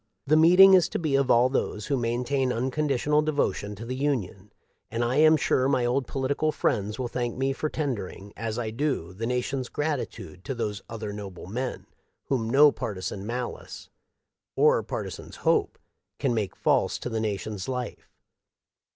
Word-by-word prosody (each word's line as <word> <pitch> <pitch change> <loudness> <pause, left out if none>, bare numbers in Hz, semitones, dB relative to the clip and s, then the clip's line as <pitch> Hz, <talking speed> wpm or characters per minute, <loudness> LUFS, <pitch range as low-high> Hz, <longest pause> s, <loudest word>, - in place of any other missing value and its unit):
"The 150 +2 +4
meeting 180 +5 +8
is 185 -3 +5
to - - -2
be 155 -5 -1
of 135 -1 +2
all 120 +1 +5
those 120 -5 -2
who 140 - 0
maintain 125 +2 0
unconditional 140 +3 +1
devotion 145 -9 -1
to 110 +4 -8
the 125 - -4
Union; 110 -8 -2 0.4
and 115 +1 -1
I 125 +3 0
am 155 +1 +6
sure 130 -2 +2
my 130 -3 +2
old 125 +2 0
political 140 +3 0
friends 105 -7 -1
will 130 -2 -2
thank 120 0 -3
me 135 +1 0
for 155 +3 -2
tendering, 105 -10 -4
as 115 0 -4
I 115 -3 -2
do, 115 - -2
the 115 +5 -4
nation's 125 +1 -2
gratitude 115 - -4
to 135 - -3
those 105 -4 -3
other 110 -2 -5
noble 100 -3 -8
men, 125 +7 -4 0.4
whom 115 -5 0
no 145 +4 +7
partisan 95 -2 -5
malice, 120 +1 -6 0.6
or - - +4
par - - -4
tisan's - - -9
hope, - - +1 0.4
can - - 0
make 105 -4 -2
false - - +1
to - - -6
the 115 -2 -2
nation's 105 -1 -3
life. 125 -1 -5
125 Hz, 170 wpm, -26 LUFS, 110-140 Hz, 0.6 s, meeting